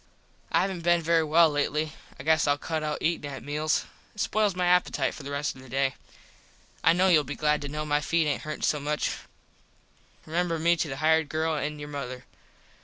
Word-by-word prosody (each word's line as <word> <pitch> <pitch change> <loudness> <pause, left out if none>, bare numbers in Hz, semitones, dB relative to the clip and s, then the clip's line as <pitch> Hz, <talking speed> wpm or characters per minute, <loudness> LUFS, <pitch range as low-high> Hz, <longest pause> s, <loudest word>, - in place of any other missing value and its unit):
I - - +4
havent 190 -3 -2
been 175 0 +3
very 165 0 +3
well 160 +1 +5
lately. 150 +1 -1 0.3
I - - -7
guess 160 +1 +3
Ill 145 0 +3
cut 160 +1 -3
out 150 -1 -3
eatin 160 -3 0
at 135 - -8
meals. 150 +1 0 0.3
It 210 - -3
spoils 210 -3 +1
my 180 0 0
appitite 180 0 +2
for - - -9
the 140 - -7
rest 145 0 -2
of 130 - -13
the 130 - -14
day. 135 +1 +1 0.9
I - - +6
kno 185 +2 +3
youll 155 -4 +5
be 145 +1 -6
glad 150 0 +1
to 145 - -4
kno 150 +2 -4
my 145 0 +1
feet 165 +2 +1
aint 150 - -1
hurtin 155 0 -6
so 150 - +2
much. 150 +1 -1 1.1
Remember 170 +1 -1
me 170 +2 +3
to 165 - -1
the 135 -1 -5
hired 160 0 +2
girl 160 +1 0
and 150 0 -3
your 145 0 -7
mother. 130 -3 -6
155 Hz, 215 wpm, -27 LUFS, 145-165 Hz, 1.1 s, I